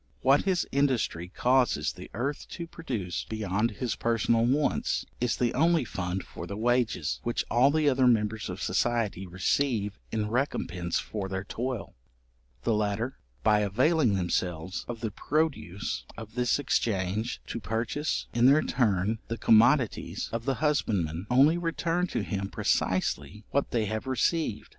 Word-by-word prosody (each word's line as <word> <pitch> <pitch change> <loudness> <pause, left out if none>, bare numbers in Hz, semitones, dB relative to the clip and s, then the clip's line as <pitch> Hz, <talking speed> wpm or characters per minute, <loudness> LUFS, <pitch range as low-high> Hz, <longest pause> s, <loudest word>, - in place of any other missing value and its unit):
What 135 +2 +4
his 185 -3 +1
industry 130 -11 +1
causes 120 - +2
the - - -10
earth 140 +4 -3
to 170 - -6
produce 120 - -4
beyond 110 0 0
his 115 +2 -3
personal 115 0 +2
wants, 145 +4 +1
is 120 -1 0
the 120 -2 +1
only 165 +1 +3
fund 90 -2 -3
for - - -8
the 100 - -5
wages, 120 -8 +1
which 120 - -1
all 125 +4 +5
the 155 0 +2
other 130 -2 +4
members 110 -3 +1
of 90 +2 -5
society 105 -2 0
receive 105 - 0
in 105 -1 -1
recompence 90 - -1
for 100 -3 -4
their 95 0 -3
toil. 120 +2 -4 0.7
The 115 - +2
latter, 105 +4 -1 0.2
by 105 -1 +4
availing 125 - +2
themselves 90 -1 -2
of 120 -1 -6
the 110 -3 -2
produce 140 - -2
of 110 -1 -9
this 125 0 +2
exchange, 110 -5 -1
to - - -5
purchase 115 - -2
in 120 +1 +5
their 145 +3 +5
turn 105 -2 +1
the 115 - -3
commodities 115 +3 +3
of 115 0 -3
the 135 -1 +1
husbandman, 95 - 0
only 140 +7 +5
return 170 +1 0
to - - -2
him 100 -1 -3
precisely 95 +1 -1
what 140 - +1
they 115 -3 0
have 110 +4 -3
received. 130 -2 0
115 Hz, 150 wpm, -28 LUFS, 100-130 Hz, 0.7 s, all